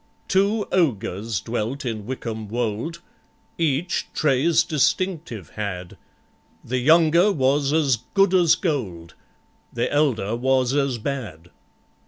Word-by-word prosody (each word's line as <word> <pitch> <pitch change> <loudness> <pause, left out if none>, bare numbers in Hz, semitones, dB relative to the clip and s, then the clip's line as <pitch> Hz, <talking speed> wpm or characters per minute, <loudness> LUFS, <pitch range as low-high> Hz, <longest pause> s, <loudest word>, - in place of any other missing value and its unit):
Two 200 +3 +1
ogres 115 - 0
dwelt 120 +5 -3
in 110 -3 -4
Wickham 115 -4 -5
Wold— 120 +9 -3 0.6
Each 165 +2 0
traits 155 +4 +3
distinctive 155 - -1
had: 95 -4 -5 0.7
The 125 +1 -1
younger 165 +7 +5
was 140 -2 +1
as 145 -5 +2 0.2
good 195 -1 +4
as 175 -4 +5
gold, 95 - -3 0.6
The 120 +3 -2
elder 120 -8 +1
was 130 +1 +1
as 140 -3 0
bad. 105 - -6
130 Hz, 110 wpm, -23 LUFS, 110-160 Hz, 0.7 s, younger